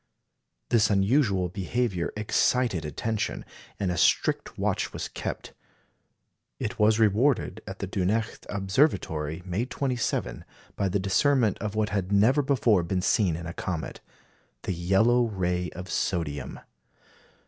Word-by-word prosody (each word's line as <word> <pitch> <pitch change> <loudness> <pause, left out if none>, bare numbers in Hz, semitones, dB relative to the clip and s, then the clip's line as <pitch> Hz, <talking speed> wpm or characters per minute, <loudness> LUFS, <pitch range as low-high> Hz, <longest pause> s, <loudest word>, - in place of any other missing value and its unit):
This 110 -3 +4
unusual 100 -2 +2
behaviour 95 0 -2
excited 105 -3 +1
attention, 110 +8 -3 0.3
and 95 -3 0
a 85 - -2
strict - - +1
watch - - -1
was - - -4
kept. - - -6 1.1
It 115 +2 -4
was 105 +1 +4
rewarded 110 0 +2
at 95 - -6
the - - -4
Dunecht 105 +4 -2
Observatory, 95 - 0
May 95 +6 -1
27, 125 -2 -2 0.3
by 100 - 0
the 95 - +1
discernment 110 +4 +2
of 105 -1 -4
what 110 0 +1
had 100 -2 -2
never 110 +8 +4
before 120 -8 +3
been 90 +2 -2
seen 95 -6 +2
in 85 +1 -6
a 85 - -5
comet 90 -4 -4 0.6
the 95 - -2
yellow 95 +8 +3
ray 90 -4 -1
of 90 +1 -7
sodium. 75 -8 -2
100 Hz, 130 wpm, -27 LUFS, 90-115 Hz, 1.1 s, This